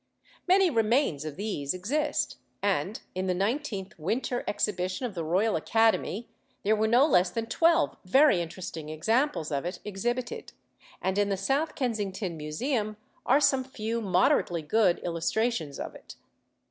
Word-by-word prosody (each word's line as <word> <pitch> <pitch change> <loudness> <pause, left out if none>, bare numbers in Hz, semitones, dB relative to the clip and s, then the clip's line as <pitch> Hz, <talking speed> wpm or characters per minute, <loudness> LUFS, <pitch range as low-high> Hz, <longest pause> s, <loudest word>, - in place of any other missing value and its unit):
Many 375 -1 +5
remains 225 - +1
of 155 -2 -5
these 185 -7 -2
exist, 290 - -1 0.3
and 195 0 0
in 185 +1 -2
the 180 - +1
Nineteenth 200 - -2
Winter 245 +9 -1
Exhibition 190 +1 -1
of 235 - -4
the 170 -3 -3
Royal 190 +7 +1
Academy 225 +4 +1 0.4
there 215 +2 +3
were 220 +1 +1
no 245 +5 +5
less 180 - +4
than 225 +5 -3
twelve 330 +6 +3
very 205 0 +5
interesting 165 -2 -6
examples 220 - 0
of 140 -1 -1
it 175 +2 -4
exhibited, 240 - -3 0.5
and 190 +1 0
in 205 0 +2
the 195 - 0
South 275 +11 0
Kensington 205 -7 -2
Museum 210 - -2 0.3
are 270 +3 +5
some 270 -3 +3
few 230 -3 -3
moderately 180 -3 +2
good 180 +2 +3
illustrations 170 - -1
of - - -5
it. - - -12
205 Hz, 145 wpm, -28 LUFS, 180-245 Hz, 0.5 s, Many